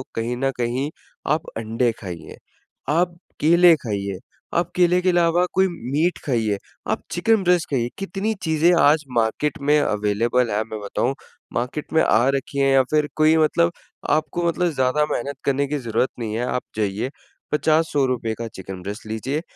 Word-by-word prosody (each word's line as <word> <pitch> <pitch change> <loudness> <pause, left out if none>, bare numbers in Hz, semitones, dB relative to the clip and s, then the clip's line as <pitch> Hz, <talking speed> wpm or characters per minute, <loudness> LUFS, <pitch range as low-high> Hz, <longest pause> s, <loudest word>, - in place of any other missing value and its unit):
कहीं 115 +2 -2
न 135 +1 0
कहीं 125 +4 -1 0.4
आप 155 +1 +1
अंडे 115 +2 0
खाइए। 90 -5 -8 0.5
आप 170 +3 +1 0.2
केले 170 +2 +6
खाइए, 100 -8 -4 0.4
आप 170 0 0
केले 180 0 +4
के 185 - +2
अलावा 175 0 +3
कोई 190 0 +4 0.2
मीट 160 +5 +1
खाइए। 110 -6 0 0.3
आप - - -1
चिकन 210 +4 +2
ब्रेस्ट 180 -2 +2
खाइए, 120 -4 0
कितनी 195 +3 -2
चीज़ें 160 +2 +3
आज 150 +2 +4
मार्केट 115 +6 0
में 150 +2 +4
अवेलेबल 115 +2 +1
है 105 +1 0
मैं 110 -1 -7
बताऊँ, 110 +5 -1 0.4
मार्केट 125 +5 -3
में 160 - +5
आ 115 +4 +3
रखी 140 +1 -3
है 135 0 +3
या 135 -1 +5
फ़िर 150 -1 +2
कोई 155 +1 +4
मतलब 170 +2 +3 0.4
आपको 155 +3 0
मतलब 175 +1 +1
ज़्यादा 135 +1 +1
मेहनत 140 +3 -3
करने 140 +1 +1
की 150 +2 -2
ज़रूरत 120 +1 0
नहीं 110 -2 -3
है। 120 +2 -1
आप 125 - -1
जाइए 105 +3 -1 0.4
₹50-₹100 145 -7 +1
का 115 - -3
चिकन 95 -1 -8
ब्रेस्ट 105 +4 -6
लीजिए। 125 +8 -2
140 Hz, 165 wpm, -22 LUFS, 115-160 Hz, 0.5 s, केले